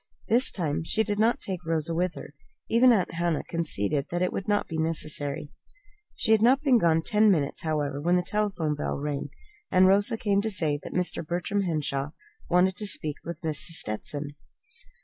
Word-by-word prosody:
This 245 +4 +4
time 160 -5 -2
she 220 +7 +2
did 205 -1 -3
not 225 +2 +2
take 185 -3 -5
Rosa 165 0 -1
with 180 +1 -1
her. - - -10 0.3
Even 245 +2 +5
Aunt 200 -6 +1
Hannah 170 -1 -1
conceded 150 - -1
that 175 +1 -1
it 180 - -1
would 195 - -4
not 205 0 +1
be 160 -1 -4
necessary. 150 -3 -1 0.6
She 220 - -1
had 220 -1 +5
not 260 +5 +4
been 260 -5 +4
gone 165 -3 +2
ten 215 +3 +3
minutes, 150 -8 0
however, 145 -3 -2
when 175 +3 +2
the 180 - +1
telephone 195 -7 -1
bell 145 - -3
rang, 145 0 -4 0.4
and 185 0 +5
Rosa 200 +3 +3
came 200 -2 +1
to 220 - -2
say 155 -7 0
that - - -9
Mr. 180 -1 +1
Bertram 175 +5 -2
Henshaw 150 -3 -2 0.4
wanted 180 +2 +3
to 210 - -2
speak 155 -5 -1
with 170 0 -7
Mrs. 160 +1 0
Stetson. 140 +7 -2
170 Hz, 190 wpm, -26 LUFS, 150-205 Hz, 0.6 s, Even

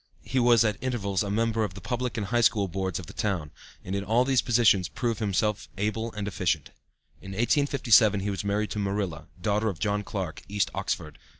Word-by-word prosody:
He 130 - 0
was 120 -1 +5
at 105 -2 0
intervals 105 -7 -1
a 100 - -2
member 115 +1 +1
of 95 -4 -4
the - - -7
Public 125 -1 -3
and 105 - -1
High 120 +4 +1
School 105 -3 +3
Boards 95 0 -2
of 90 - -6
the - - -11
town, 90 -8 -2 0.3
and 95 - -4
in 100 - -1
all 115 +4 +3
of - - -5
these 135 -2 +4
positions 110 -7 +3
proved 115 -3 -2
himself 105 0 0
able 110 +3 -1
and 105 -1 -4
efficient. 85 -7 -1 0.5
In 95 +1 -8
1857 120 -3 +3
he 100 +1 -1
was 95 - -3
married 105 +1 -1
to 105 - -2
Marilla, 100 -3 -2
daughter 105 +1 +1
of 95 - -5
John 105 +5 0
Clark, 95 -6 -4
East 100 0 0
Oxford. 95 -6 -3
105 Hz, 210 wpm, -27 LUFS, 95-115 Hz, 0.5 s, was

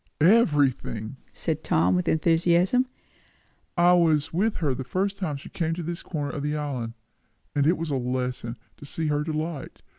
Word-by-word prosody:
"Everything!" 145 - +3
said - - -3
Tom 85 +3 +3
with 90 - 0
enthusiasm. 170 +9 +3 0.9
"I 175 +1 +6
was 160 -3 +3
with 205 +6 +1
her 150 -6 0
the 130 - -4
first 195 +8 -1
time 155 -7 -2
she 140 - -11
came 165 -1 -1
to 175 - -4
this 170 +2 -4
corner 145 -4 -3
of 145 - -4
the 150 +1 -1
island, 130 -6 -3 0.6
and 145 0 +2
it 170 - +3
was 165 -1 -3
a 135 - +1
lesson, 125 -1 -3 0.2
to - - -11
see 160 +2 -2
her 150 0 +1
delight. 155 -1 -4
155 Hz, 175 wpm, -26 LUFS, 135-170 Hz, 0.9 s, I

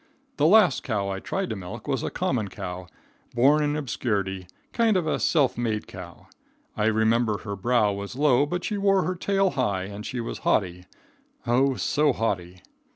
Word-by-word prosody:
The 150 - +4
last 205 0 +5
cow 100 -7 -2
I 95 0 -3
tried 190 - -3
to - - -2
milk 100 +4 -8
was 135 -4 -1
a - - -2
common 130 - -1
cow, 90 -1 -7 0.5
born 140 +5 +4
in 145 0 0
obscurity; 100 -9 -2 0.3
kind 225 -4 +3
of 175 - -1
a 155 - 0
self 140 -7 +2
made 110 -3 -1
cow. 90 -2 -11 0.5
I 105 - 0
remember 110 0 +2
her 100 -1 -6
brow 105 0 +2
was 100 +3 -6
low, 145 0 +3
but 175 +4 -3
she 210 -2 -2
wore 195 -1 +3
her 185 - -1
tail 195 +1 +1
high 100 -8 -1
and 100 +2 -7
she 125 - -5
was 115 - -5
haughty, 90 -3 0 0.6
oh, 130 +3 +2
so 150 +2 +1
haughty. 95 -6 -3
120 Hz, 180 wpm, -25 LUFS, 100-150 Hz, 0.6 s, last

